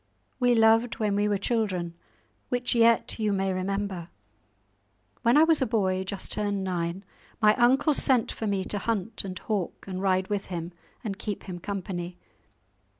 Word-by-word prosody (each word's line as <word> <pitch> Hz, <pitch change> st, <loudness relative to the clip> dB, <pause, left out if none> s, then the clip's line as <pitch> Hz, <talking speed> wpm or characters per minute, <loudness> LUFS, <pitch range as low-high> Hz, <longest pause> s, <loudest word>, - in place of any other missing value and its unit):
We 245 Hz, -1 st, +4 dB
loved 225 Hz, +1 st, +4 dB
when 210 Hz, -2 st, 0 dB
we 205 Hz, +1 st, +2 dB
were 205 Hz, -1 st, +1 dB
children, 195 Hz, -6 st, -1 dB, 0.6 s
which 245 Hz, 0 st, 0 dB
yet 230 Hz, -1 st, +3 dB
you 215 Hz, -1 st, +1 dB
may 195 Hz, -1 st, 0 dB
remember. 190 Hz, -2 st, -3 dB, 1.1 s
When 235 Hz, +4 st, +4 dB
I 305 Hz, -, +8 dB
was 320 Hz, -2 st, +3 dB
a 260 Hz, -, +2 dB
boy 190 Hz, -4 st, +1 dB
just 195 Hz, 0 st, -5 dB
turned 205 Hz, -2 st, -1 dB
nine, 180 Hz, 0 st, -2 dB, 0.4 s
my 215 Hz, -1 st, +6 dB
uncle 265 Hz, +5 st, +4 dB
sent 260 Hz, -4 st, +2 dB
for 220 Hz, -, -4 dB
me 200 Hz, -2 st, 0 dB
to 205 Hz, -, -1 dB
hunt, 220 Hz, -1 st, 0 dB
and 185 Hz, -2 st, -6 dB
hawk, 200 Hz, -2 st, -3 dB
and 185 Hz, -1 st, -4 dB
ride 190 Hz, -1 st, +1 dB
with 205 Hz, -1 st, -2 dB
him, 170 Hz, -1 st, -5 dB, 0.3 s
and 200 Hz, -3 st, -4 dB
keep 210 Hz, -3 st, -4 dB
him 180 Hz, -2 st, -7 dB
company. 180 Hz, -2 st, -5 dB
200 Hz, 165 wpm, -27 LUFS, 185-225 Hz, 1.1 s, I